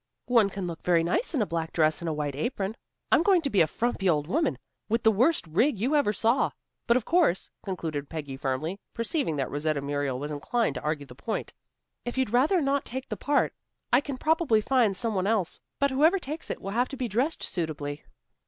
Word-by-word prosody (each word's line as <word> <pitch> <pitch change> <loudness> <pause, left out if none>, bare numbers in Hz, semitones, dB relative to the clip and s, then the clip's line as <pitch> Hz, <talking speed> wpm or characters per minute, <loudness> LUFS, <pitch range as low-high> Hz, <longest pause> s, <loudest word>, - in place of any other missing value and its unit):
"One 230 -5 +4
can 195 -1 -5
look 170 -2 -5
very 170 -2 +3
nice 315 - 0
in 245 - +3
a - - -1
black 165 -2 -3
dress 155 -1 +2
and 170 - -2
a - - -1
white 145 -2 -2
apron. 195 - -2 0.4
I'm - - +6
going 360 -1 +4
to 280 - -1
be 200 - +4
a 160 - +4
frumpy 210 -1 0
old 150 -3 +2
woman, 305 - 0 0.3
with 230 +2 +1
the 220 - +6
worst 250 - +2
rig 205 - +2
you 260 +8 +1
ever 285 -8 +3
saw. 230 +5 +2 0.4
But 235 - +5
of 245 - -3
course," 335 - +2
concluded 160 -7 -4
Peggy 145 -4 -5
firmly, 140 +8 -2 0.2
perceiving 230 - -1
that 135 -2 -2
Rosetta 145 +1 0
Muriel 140 -2 -2
was 145 +3 -4
inclined 220 +11 0
to - - -5
argue 150 -1 -2
the 130 - -12
point, 140 - -4 0.5
"If 240 +1 -5
you'd 260 -5 +1
rather 305 +9 +4
not 275 -1 +1
take 260 +2 -6
the - - -2
part, 290 0 +1 0.4
I 250 - +6
can 280 -2 -5
probably 310 -6 +3
find 220 -4 +2
some 230 -2 0
one 190 -1 0
else. 210 -5 0 0.2
But 280 -1 +2
whoever 310 +8 +4
takes 310 -2 -5
it, - - -5
will 195 - -4
have 245 +4 +1
to 275 - -7
be 250 -2 -1
dressed 250 +9 -1
suitably." 150 -4 -3
210 Hz, 220 wpm, -27 LUFS, 155-265 Hz, 0.5 s, I'm